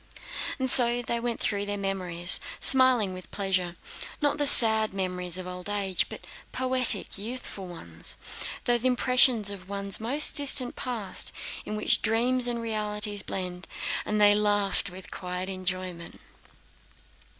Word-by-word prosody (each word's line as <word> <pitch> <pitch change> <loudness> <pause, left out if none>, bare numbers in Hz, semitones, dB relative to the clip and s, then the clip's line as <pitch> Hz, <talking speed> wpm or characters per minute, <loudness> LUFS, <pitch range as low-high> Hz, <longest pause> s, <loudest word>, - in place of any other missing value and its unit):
So 245 -1 +4
they 235 +1 -3
went 235 -1 -4
through 205 -1 -2
their 205 0 -3
memories, 185 -3 0 0.2
smiling 255 -7 +4
with 185 0 -11
pleasure: 185 -3 -2 0.4
not 295 0 -1
the 290 - 0
sad 220 -5 +9
memories 180 -2 -3
of 185 - -6
old 180 +1 -8
age, 200 -2 -1
but - - -10 0.3
poetic, 255 -5 +1
youthful 215 -3 -7
ones—those 175 - -6
impressions 250 -4 +2
of 190 -2 -9
one's 200 -1 -3
most 265 +7 +2
distant 270 -3 +2
past 230 -7 -3 0.3
in 210 - -6
which 215 - 0
dreams 240 +3 +1
and 240 -1 -2
realities 210 -2 -2
blend—and 185 +3 -5
they 205 0 +5
laughed 205 -1 0
with 185 +1 -13
quiet 180 0 -6
enjoyment. 185 -2 -6
205 Hz, 130 wpm, -26 LUFS, 185-240 Hz, 0.4 s, sad